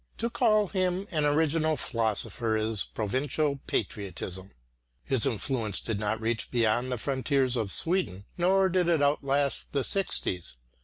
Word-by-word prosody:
To 235 +1 -1
call 215 -4 +3
him 185 0 0
an 155 -3 +1
original 155 +1 +2
philosopher 115 -1 -1
is 110 -2 +1
provincial 140 +6 -1
patriotism. 95 -2 -3 0.5
His 130 -5 +2
influence 115 -2 -1
did 110 -3 -3
not 105 +1 -1
reach 115 0 -1
beyond 120 +1 +1
the 125 - -1
frontiers 130 0 0
of 110 -5 -1
Sweden, 110 - +1
nor 190 +2 +3
did 180 -1 +1
it 165 -4 +3
outlast 140 -1 0
the 140 -2 +1
sixties. 90 - -1
130 Hz, 140 wpm, -28 LUFS, 110-160 Hz, 0.5 s, call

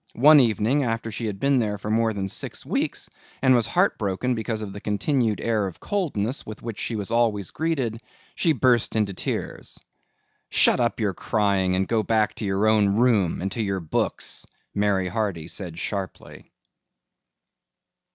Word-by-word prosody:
One 150 +5 +8
evening 120 +3 +2
after 115 -3 -2
she 110 +2 -3
had 100 -2 -4
been 140 -1 +3
there 105 -3 -1
for 105 +2 -5
more 115 0 +2
than 100 -2 -3
six - - -5
weeks - - -1 0.3
and 130 -1 +4
was 120 -3 +3
heartbroken 125 - +1
because 110 -1 -3
of 100 -2 -6
the 100 - -8
continued 110 +2 0
air 110 -4 0
of 95 - -9
coldness 140 - -1
with 110 -1 -9
which 115 -3 -5
she 115 - -2
was 100 -3 -4
always 110 -5 +1
greeted, 135 -9 -2 0.3
she 165 - +2
burst 125 -5 +2
into 105 -3 +1
tears. - - -4 0.7
"Shut - - +4
up 120 0 0
your 105 -4 0
crying 100 -2 +1
and 95 0 0
go 115 -1 +1
back 110 -1 +1
to 110 - -4
your 100 +1 +1
own 105 -2 +3
room 110 -8 +2
and 95 - -2
to 115 - -2
your 100 -3 -1
books," 80 -3 -2 0.3
Mary 100 -2 +1
Hardy 90 -5 -2
said 85 -2 -4
sharply. 95 0 -6
110 Hz, 170 wpm, -24 LUFS, 100-120 Hz, 0.7 s, One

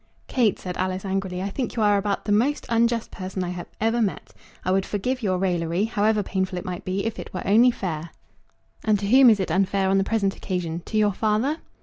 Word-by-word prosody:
"Kate," 235 -6 +1
said 180 -1 -6
Alice, 185 +1 -2
angrily, 190 -1 -2
"I 200 - -3
think 250 +2 -3
you 225 - +1
are 205 -1 +4
about 200 0 -1
the 210 - -1
most 250 +8 +2
unjust 230 0 +1
person 185 -1 -4
I 180 -1 -5
ever 225 +2 +1
met. 195 -8 -2 0.3
I 185 - +1
would 190 0 +2
forgive 250 +7 -2
your 190 -4 0
raillery, 175 -1 0
however 215 -1 +1
painful 190 -1 -2
it - - -5
might 180 -1 -5
be, 190 +2 -2
if 225 - -3
it - - -7
were - - -4
only 225 +5 +6
fair." 170 -8 -4 0.7
"And 215 -1 +3
to 200 0 -3
whom 255 +3 +7
is 215 -3 +4
it 190 - -2
unfair 195 0 +1
on 195 0 +3
the - - +2
present 200 -2 0
occasion; 175 -3 -3
to 215 - -2
your 210 -1 +3
father?" 220 +9 0
200 Hz, 225 wpm, -24 LUFS, 185-220 Hz, 0.7 s, whom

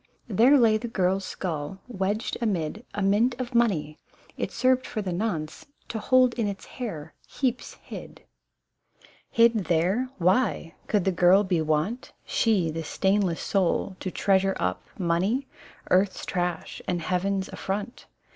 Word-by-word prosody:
there 240 +7 +5
lay 225 -4 +5
the 235 +2 -5
girl's 190 -3 0
skull 175 0 -4
wedged 205 -1 -2
amid 200 -2 -1
A 205 - -1
mint 225 +6 +2
of 245 -1 -4
money, 175 -11 +1 0.4
it - - -3
served 255 0 +2
for 220 - -4
the 190 -4 -2
nonce 170 - -3 0.2
To 225 - -3
hold 255 +2 +4
in 220 - +1
its 200 -1 -5
hair 165 - -6
heaps 250 -3 -2
hid! - - -10 1.1
Hid 230 -4 +3
there? 185 +10 +1
Why? 185 -1 +1
Could 205 -4 +1
the 190 - +3
girl 180 +3 +5
be 180 -4 0
wont 155 +10 -1
(She 195 -8 +1
the 165 +1 -4
stainless 190 +2 +1
soul) 190 0 0
to 190 - -3
treasure 195 +1 +2
up 90 0 -1 0.2
Money, 190 +9 0 0.5
earth's 185 +1 +2
trash 175 -3 -3
and 175 -2 0
heaven's 190 +2 0
affront? 205 +4 -5
195 Hz, 145 wpm, -26 LUFS, 175-225 Hz, 1.1 s, there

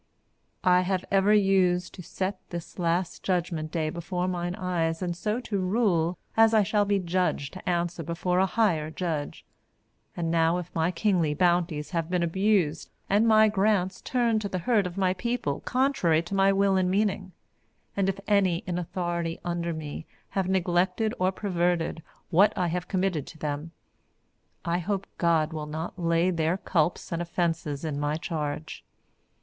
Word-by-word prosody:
I 180 0 +5
have 185 0 -1
ever 195 +1 +4
used 190 -3 +3
to 185 - -9
set 185 +3 -3
the 170 -1 -5
Last 170 +1 0
Judgement 170 -4 -1
Day 155 -2 -1
before 180 +2 -3
mine 175 -1 -2
eyes 170 -2 -1
and 175 -1 -2
so 210 +6 -1
to 205 -5 -2
rule 185 -4 +1 0.2
as 225 0 +5
I 215 - +5
shall 205 +1 +1
be 200 0 +2
judged 180 -6 -1
to 185 -1 -5
answer 175 -1 -1
before 175 +3 -1
a 190 - +3
higher 180 -8 +1
judge, 160 -1 -4 0.7
and 165 -1 -1
now 165 +1 +3
if 180 -1 -6
my 165 +1 +1
kingly 180 -5 +1
bounties 175 -3 +1
have 165 -2 -2
been 180 -1 +1
abused 175 -2 +1 0.2
and 210 +3 +4
my 220 -1 +6
grants 195 -2 +1
turned 235 -4 +1
to 200 - -3
the 185 - -2
hurt 200 +1 +2
of 180 +1 -9
my 185 -2 +2
people 235 - -2
contrary 245 - +2
to 175 - -8
my 195 0 +4
will 195 0 +3
and 185 -1 +2
meaning, 195 -1 0 0.6
and 195 -1 +1
if 195 0 -3
any 190 -4 +2
in 180 -2 -2
authority 170 -1 -3
under 170 -1 -2
me 155 0 -6 0.2
have 190 -2 -1
neglected 185 +4 +1
or 185 +1 +2
perverted 175 -4 -1 0.3
what 195 +6 +4
I 180 -2 +1
have 180 +1 -3
committed 185 -6 -1
to 160 - -11
them, 150 +1 -4 1.0
I 170 +1 0
hope 195 +2 -2
God 165 -2 +2
will 155 -1 -4
not 160 +4 -5
lay 170 +1 +2
their 165 +1 0
culps 170 -3 0
and 170 0 -1
offenses 165 -4 -2
in 145 -2 -2
my 145 +1 0
charge. 155 -2 -4
180 Hz, 170 wpm, -27 LUFS, 165-195 Hz, 1.0 s, my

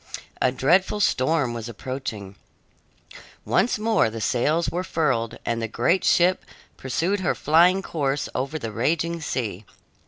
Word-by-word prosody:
A 130 - +3
dreadful 180 +11 +2
storm 135 -7 +1
was 115 0 -6
approaching. 115 -5 -6 1.1
Once 240 - +2
more 215 - +2
the 115 +1 -7
sails 145 +9 +1
were 180 +1 -2
furled, 135 -10 -1
and 115 0 -1
the 115 - -2
great 130 - +1
ship 180 +2 +3 0.3
pursued 170 +10 -1
her 185 - 0
flying 175 +5 +4
course 140 -5 -2
over 135 +5 -2
the 115 -7 -5
raging 165 +9 -1
sea. 110 -9 -3
145 Hz, 135 wpm, -24 LUFS, 120-170 Hz, 1.1 s, flying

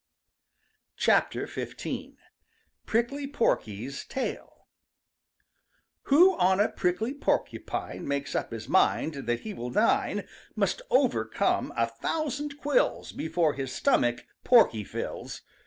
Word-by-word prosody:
XV. - - +1 1.1
PRICKLY 260 +5 0
PORKY'S 130 - -1
TAIL 265 - -5 1.4
Who 350 +7 +6
on 190 +1 +4
a 205 - +4
prickly 195 +8 -1
porcupine 290 - -2
Makes 140 0 -2
up - - -1
his 115 -1 -6
mind 160 -3 +2
that 120 0 0
he 215 - -6
will 120 -8 -5
dine 210 - +1 0.3
Must - - 0
overcome - - +1
a - - +3
thousand 295 -2 -3
quills 295 +12 +1
Before 160 -1 0
his 135 -1 -4
stomach 120 - +1 0.2
Porky 220 - +5
fills. - - -6
205 Hz, 105 wpm, -28 LUFS, -, 1.4 s, Who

